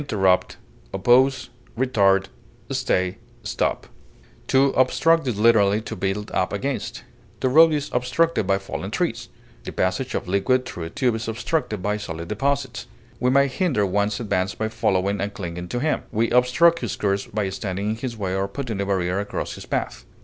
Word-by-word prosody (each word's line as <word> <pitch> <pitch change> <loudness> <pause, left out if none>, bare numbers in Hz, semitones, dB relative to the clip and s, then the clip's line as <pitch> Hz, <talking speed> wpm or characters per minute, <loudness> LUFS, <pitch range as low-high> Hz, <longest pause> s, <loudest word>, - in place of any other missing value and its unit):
barricade, 95 -9 +1 0.4
clog, 125 +7 +4 0.5
impede, 100 -6 +3 0.4
retard, 90 0 -2 0.6
To 135 +1 +4
obstruct 155 +5 +3
is 120 -5 -1
literally 105 -2 +4
to 110 - -6
build 100 +2 -3
up - - 0
against; - - -3 0.4
the - - +1
road 160 +4 +7
is 150 -1 -2
obstructed 125 - +1
by 95 0 +3
fallen 95 - -5
trees; - - -2 0.3
the - - -6
passage 95 +8 -1
of - - -3
liquid 100 +7 +1
through 90 -8 -6
a - - -6
tube 130 0 0
is 110 0 -4
obstructed 115 - -2
by 105 +1 0
solid 85 -5 -6
deposits. 135 +2 -1 0.3
We 125 - +2
may 140 +2 +4
hinder 135 - 0
one's 100 +2 0
advance 100 -4 -1
by 110 0 -2
following 100 -1 0
and 100 +1 -2
clinging 90 -2 -5
to 120 - -3
him; 155 +4 0
we 115 +1 0
obstruct 125 +8 +4
his 120 - -3
course 100 -1 -1
by 105 -2 -2
standing 95 +2 -3
in - - -2
his 120 -1 -5
way 95 -3 -2
or 95 +1 0
putting 110 -1 -4
a - - -1
barrier 95 -1 0
across 100 - -4
his - - -10
path. - - -3
105 Hz, 170 wpm, -23 LUFS, 95-130 Hz, 0.6 s, road